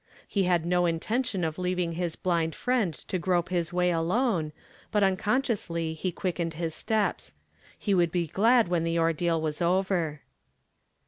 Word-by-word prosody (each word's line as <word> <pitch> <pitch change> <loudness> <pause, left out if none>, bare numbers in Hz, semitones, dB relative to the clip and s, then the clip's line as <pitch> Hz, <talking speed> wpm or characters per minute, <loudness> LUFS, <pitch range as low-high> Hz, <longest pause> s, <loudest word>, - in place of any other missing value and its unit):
He 195 -2 +1
had 175 -2 +2
no 180 0 +2
intention 195 +4 -1
of 160 -1 -2
lenving 180 -2 -1
his 170 -1 -2
blind 165 -3 0
friend 245 -8 +1 0.2
^o 185 - -2
grope 175 -1 +1
liis 175 -3 -1
way 180 0 +2
alone, 175 0 +1 0.4
but 210 -2 +2
unconsciously 195 -5 0
he 180 +3 -3
quickened 170 -2 -3
his 165 0 -3
steps, 180 - -1 0.5
lie 205 - +3
would 175 -3 +3
be 175 -1 0
glad 225 - +3
when 175 -2 0
the 165 0 0
ordeal 165 0 +1
was 155 +1 -3
over. 175 -4 +1
175 Hz, 155 wpm, -28 LUFS, 165-190 Hz, 0.5 s, lie